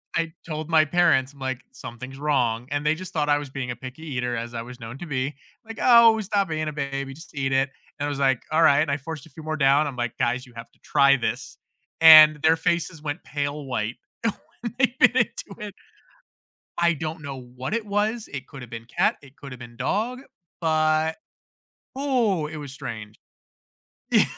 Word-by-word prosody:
I 165 -1 0 0.2
told 155 -1 -5
my 160 -1 +5
parents, 145 -5 +3
I'm 140 - -19
like, 130 -1 -3
"Something's 130 +3 -9
wrong," 125 -5 0
and 145 +1 -1
they 155 +1 +3
just 185 +2 -8
thought 150 -2 0
I 145 - +4
was 145 -1 -6
being 130 -2 -4
a - - -4
picky 130 +4 -9
eater 125 -5 -2
as 120 +1 -5
I 115 - -3
was 125 +2 -10
known 115 +2 -8
to 175 - -6
be, 140 -1 -2 0.3
like, 225 0 -9
"Oh, 235 -2 +7
stop 200 -1 0
being 155 -1 -2
a - - -7
baby, 140 -2 -4
just 160 +2 -14
eat 135 -1 -1
it," 135 +1 +2 0.3
and 145 - -1
I - - -1
was 145 -1 -4
like, 135 -3 +3
"Alright," 155 -3 +5
and 150 - -2
I - - +2
forced 150 0 -7
a - - -16
few 155 +3 -12
more 155 0 -3
down, 140 +1 +4
I'm 135 -3 -6
like, 120 -1 -3
"Guys, 125 +1 0
you 125 - -18
have 115 0 -10
to - - -32
try 140 -1 +4
this," 120 +1 -4 0.4
and 155 -2 +10
their 160 +1 +5
faces 170 -1 -1
went 150 +3 -5
pale 145 0 -3
white 120 -2 -2 0.3
when 230 +1 -5
they 260 -1 +3
bit 250 0 +6
into 225 -4 -2
it. 200 - -11 1.0
I 170 0 +3
don't 160 +1 -5
know 140 -2 -6 0.2
what 130 +9 -4
it 230 -1 -1
was, 210 +2 -1
it 135 -2 -6
could've 135 -5 -10
been 115 -1 -7
cat, 120 - +1
it 135 0 -17
could've 135 -3 -10
been 120 -1 -11
dog, 240 +5 -1 0.4
but 155 0 +2 0.9
Ooh, 230 - +1
it 155 - -7
was 145 -3 -7
strange. 115 -6 -8 0.9
Ye - - +6
145 Hz, 205 wpm, -24 LUFS, 130-160 Hz, 1.0 s, and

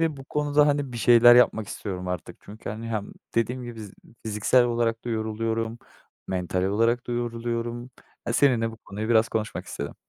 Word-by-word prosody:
ve 160 -3 0
bu 135 - -10
konuda, 150 0 +2
hani, 145 -3 0
bir 120 - -5
şeyler 120 +1 +7
yapmak 110 -4 +3
istiyorum 90 -4 -5
artık. 90 0 -5
Çünkü, 105 +2 -8
hani, 115 +2 -6
hem 105 -3 -4 0.2
dediğim 125 +2 0
gibi: 115 -2 -8
"Z 105 - -10 0.3
fiziksel 110 +4 +3
olarak 115 -1 -1
da - - -2
yoruluyorum, 115 +1 -2 0.5
mental 90 0 -1
olarak 115 +5 +1
da 120 - -2
yoruluyorum." 120 +1 -3 0.4
E, 115 - -1
seninle 120 -4 +3
bu 110 - -11
konuyu 105 +1 -6
biraz 110 -1 +4
konuşmak 110 -1 -3
istedim. - - -6
115 Hz, 180 wpm, -25 LUFS, 110-120 Hz, 0.5 s, şeyler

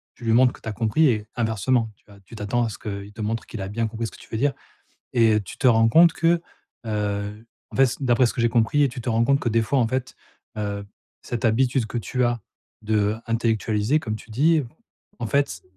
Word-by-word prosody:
tu 120 - -11
lui 115 - +2
montres 125 +1 +5
que - - -15
tu - - -10
as 105 - -2
compris 120 +9 +2
et 105 -4 0
inversement 110 +1 +1
tu - - -36
vas 100 -1 -16
tu 115 - -14
t'attends 115 +3 0
à - - -2
ce - - -8
qu'il 100 0 -7
te 110 - -8
montre 115 +2 -2
qu'il 110 - -7
a 95 - -4
bien 115 +2 -1
compris 115 +1 -4
ce - - -9
que - - -14
tu - - -15
veux 110 - -2
dire, 140 +3 +2 0.6
et 110 -3 +4
tu - - -10
te - - -3
rends 115 -1 +5
compte 165 +5 +6
que, 165 +1 +2 0.5
heu, 105 0 -3 0.3
en - - -9
fait, 135 - +6
c - - -3
d'après 125 0 +3
ce - - -3
que 120 - -2
j'ai 115 - +3
compris 120 +6 +2
et 140 - +3
tu 120 0 -7
te 120 - -3
rends 115 +1 +2
compte 140 +1 +3
que, 120 - -1
des 115 +1 +2
fois 135 +4 +1
en 115 - +2
fait, 130 +1 -3 0.4
heu, 100 -1 -3 0.4
cette 120 -1 -3
habitude 125 +1 +2
que 120 - -4
tu 125 +2 -1
as 120 -2 0 0.4
d'intellectualiser, 110 +3 0
comme 110 -7 -4
tu 110 - -12
dis, 155 +5 +3 0.6
en 115 - -2
fait, 140 -12 0
115 Hz, 245 wpm, -24 LUFS, 105-125 Hz, 0.6 s, compte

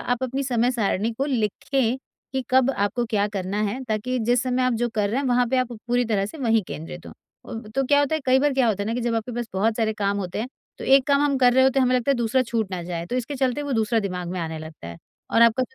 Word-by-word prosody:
आप 245 +1 -1
अपनी 260 +2 -1
समय-सारिणी 235 -4 0
को 270 +5 -2
लिखें 250 0 0 0.4
कि 265 0 -1
कब 260 0 +4
आपको 205 +1 -1
क्या 210 -3 +1
करना 200 0 -3
है 215 +6 -2
ताकि 225 +4 -1
जिस 240 +1 +2
समय 255 0 0
आप 255 - +2
जो 240 - +2
कर 210 -2 +1
रहे 250 +5 0
हैं 280 - -2
वहाँ 245 0 +3
पे 260 - +1
आप 255 -1 -1
पूरी 240 +2 -1
तरह 205 -4 0
से 310 - -10
वहीं 225 -5 +2
केंद्रित 165 +3 -7
हों। 225 - -11
तो 270 +5 0
क्या 285 +2 +4
होता 290 +2 +1
है 315 - -1
कई 260 0 +5
बार 290 +1 +2
क्या 260 -2 +3
होता 205 -2 0
है - - -4
ना 225 - -1
कि 245 - -2
जब 235 -1 -1
आपके 225 +2 -3
पास 240 0 -3
बहुत 215 +4 +1
सारे 220 -2 +1
काम 200 -1 -1
होते 185 -2 -4
हैं 235 - -3 0.3
तो - - -6
एक 270 -1 +5
काम 280 -1 +3
हम 290 -1 +2
कर 250 -1 +5
रहे 260 +1 +5
होते 265 0 +3
हैं 265 - +4
हमें 255 0 +2
लगता 250 +2 0
है - - +4
दूसरा 240 +2 +1
छूट 230 -4 -2
ना 180 -2 -4
जाए, 170 -1 -4
तो 245 - -3
इसके 255 +3 -3
चलते 265 +2 0
वो 285 - -3
दूसरा 225 -1 +1
दिमाग 180 -3 -4
में 180 +1 -4
आने 160 -1 -4
लगता 155 - -10
है। 85 - -8 0.3
और 230 - +5
आपका 235 +2 +4
कोई 260 - -7
235 Hz, 285 wpm, -24 LUFS, 210-260 Hz, 0.4 s, कई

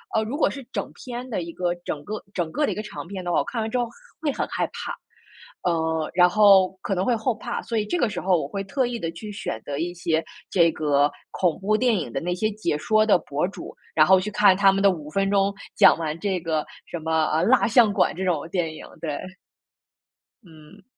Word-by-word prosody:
呃， 220 - +3
如 250 +7 -4
果 - - +3
是 275 -1 -7
整 - - -4
篇 250 0 -7
的 210 - -2
一 170 0 -6
个 175 -1 -1
整 145 -1 -4
个 215 0 -5
整 170 -3 -2
个 300 - +1
的 - - -1
一 - - -3
个 215 - -3
长 190 - -8
篇 190 -1 -6
的 175 - -2
话， - - +3
我 - - +1
看 230 - -4
完 220 - -2
之 250 - -1
后 240 - +1 0.4
会 295 -3 +1
很 - - -2
害 - - -1
怕。 - - -6 0.7
呃， 160 -2 0
然 180 0 +5
后 195 -2 +6
可 195 - -2
能 185 - 0
会 245 - +2
后 225 +1 -1
怕， 240 +2 -4
所 230 - -3
以 210 - 0
这 350 - -1
个 235 - +2
时 185 -4 -4
候 185 -3 +3
我 140 - -4
会 195 +5 -4
特 255 +6 0
意 240 -1 -3
地 165 0 -3
去 210 +5 -9
选 110 - -5
择 140 -1 -4
一 175 +3 -2
些 165 -2 0 0.3
这 170 -3 +4
个 145 -1 +2 0.2
恐 175 -4 0
怖 210 +2 +1
电 245 -2 +2
影 125 -9 -4
的 - - -2
那 180 +1 -1
些 215 +4 0
解 205 -7 -2
说 215 +6 +2
的 205 - +5
博 150 +2 -2
主， 195 - -9 0.2
然 155 -1 +6
后 190 0 +7
去 210 +3 -4
看 205 -2 +5
他 195 -1 +6
们 195 0 0
的 200 - +6
5 150 -4 -7
分 195 +4 0
钟， 200 0 +2 0.2
讲 - - +7
完 155 -1 -3
这 195 -3 -1
个 160 -2 -1 0.2
什 170 - -6
么， 160 0 +1
呃， 160 +2 +2
《蜡 250 +5 +4
像 225 -2 +5
馆》 - - +2
这 190 - -2
种 165 -4 0
电 165 -3 -1
影， - - -10 0.2
对。 150 -3 -3 1.2
嗯。 165 +2 -16
185 Hz, 265 characters per minute, -24 LUFS, 160-215 Hz, 1.2 s, 后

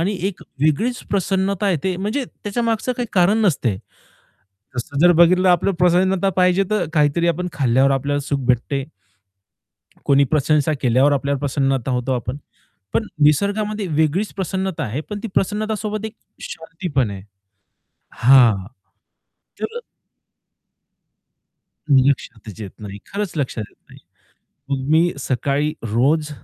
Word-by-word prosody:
आणि 195 +4 0
एक 195 - -9 0.2
वेगळीच 220 - +1
प्रसन्नता 195 0 0
येते. 180 +2 -1
म्हणजे 215 +9 -2
त्याच्या 220 0 -5
मागचं 230 +2 0
काही 245 -1 -2
कारण 190 +3 +3
नसते. 125 - +1 1.0
तसं 130 +3 -4
जर 175 +2 +7
बघितलं 180 +2 +5
आपलं 175 +2 +2
प्रसन्नता 185 +2 +3
पाहिजे 180 +1 +3
तर 210 -5 +1
काहीतरी 150 +3 +2
आपण 180 +2 -1
खाल्ल्यावर 135 -1 +2
आपल्याला 145 +2 -1
सुख 140 -1 0
भेटते. 130 +2 0 1.2
कोणी 140 0 +4
प्रशंसा 150 +2 +1
केल्यावर 130 +3 +3
आपल्यावर 140 0 -1
प्रसन्नता 135 -2 0
होतो 125 +1 -1
आपण. 125 +2 -3 0.6
पण 220 - +1 0.2
निसर्गामध्ये 205 +7 +1
वेगळीच 160 +6 0
प्रसन्नता 190 -3 -2
आहे, 120 +6 -3
पण 205 +6 -7
ती 230 - -4
प्रसन्नतासोबत 215 +1 -1
एक 220 - -9 0.3
शांती 165 +2 -7
पण 130 -6 +2
आहे. 95 -1 -7 0.9
हां. 115 -6 +5 1.0
तर 465 +2 -3 2.1
लक्षातच 125 -6 +1
येत 100 -3 -6
नाही. 100 -1 -8
खरंच 200 -1 -3
लक्षात 125 -6 -2
येत - - -28
नाही. - - -15 0.7
मग 135 0 -2
मी 165 +3 +4
सकाळी 140 +3 -1 0.2
रोज 150 +6 +2
155 Hz, 125 wpm, -20 LUFS, 135-195 Hz, 2.1 s, जर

